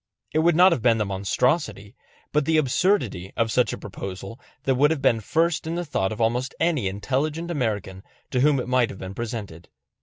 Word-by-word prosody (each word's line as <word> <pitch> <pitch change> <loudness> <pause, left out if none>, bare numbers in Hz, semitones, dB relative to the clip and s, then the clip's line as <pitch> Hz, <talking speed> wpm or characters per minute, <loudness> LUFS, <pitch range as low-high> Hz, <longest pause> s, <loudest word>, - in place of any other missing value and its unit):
It 155 - +2
would 170 +1 +3
not 180 +3 +7
have 150 - 0
been 115 -1 +4
the 105 - 0
monstrosity, 100 - -1 0.4
but 150 -1 +1
the 160 +1 +2
absurdity, 130 - +1
of 115 -1 +1
such 125 +1 +2
a - - -4
proposal, 95 +5 -7 0.2
that 135 - +2
would 140 +3 +4
have 160 -2 0
been 125 -4 +3
first 160 +8 0
in 165 - -2
the 175 0 -2
thought 95 -10 -1
of 110 - -6
almost 120 +3 0
any 160 - +1
intelligent 145 - -2
American 105 - -2 0.3
to 125 - +1
whom 140 +1 +4
it 125 - -4
might 125 -2 +2
have - - -8
been 95 +1 -7
presented. 105 -7 -6
125 Hz, 205 wpm, -24 LUFS, 105-155 Hz, 0.4 s, not